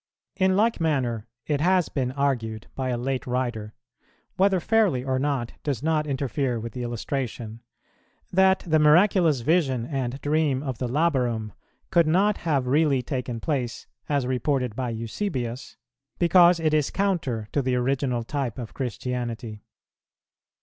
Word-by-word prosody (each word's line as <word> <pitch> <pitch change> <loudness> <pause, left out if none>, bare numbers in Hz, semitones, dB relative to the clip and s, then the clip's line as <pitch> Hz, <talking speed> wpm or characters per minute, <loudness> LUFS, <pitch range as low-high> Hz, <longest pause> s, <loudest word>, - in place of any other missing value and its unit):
In 190 -1 +2
like 225 -2 +2
manner, 125 -9 0 0.2
it 145 -2 0
has 180 +1 +3
been 130 -3 -2
argued 120 -6 -1
by 130 -1 -3
a 125 - 0
late 130 +2 -3
writer, 120 -4 -2 0.6
whether 195 0 +3
fairly 195 - +2
or 130 -1 0
not 135 -4 -1
does 140 -3 -3
not 155 -1 +1
interfere 135 -2 -1
with 115 -1 -6
the 125 - -5
illustration, 120 -1 -4 0.7
that 190 +1 +4
the 160 -2 +3
miraculous 160 - +4
vision 135 -5 +1
and 135 -1 -3
dream 145 -2 +1
of 130 -5 -4
the 125 - -1
Labarum 125 - 0 0.4
could 170 -2 +4
not 195 +6 +3
have 145 -6 0
really 140 -1 +2
taken 125 -3 -3
place, 125 -5 -3 0.2
as 140 -3 +1
reported 130 -2 -1
by 125 0 -2
Eusebius, 120 - -4 0.4
because 175 0 +5
it 155 -1 +1
is 150 -2 +2
counter 160 - -1
to 145 - +1
the 130 -1 0
original 125 -1 0
type 135 -2 -3
of 120 -4 -7
Christianity. 120 -2 -4
135 Hz, 145 wpm, -25 LUFS, 120-155 Hz, 0.7 s, because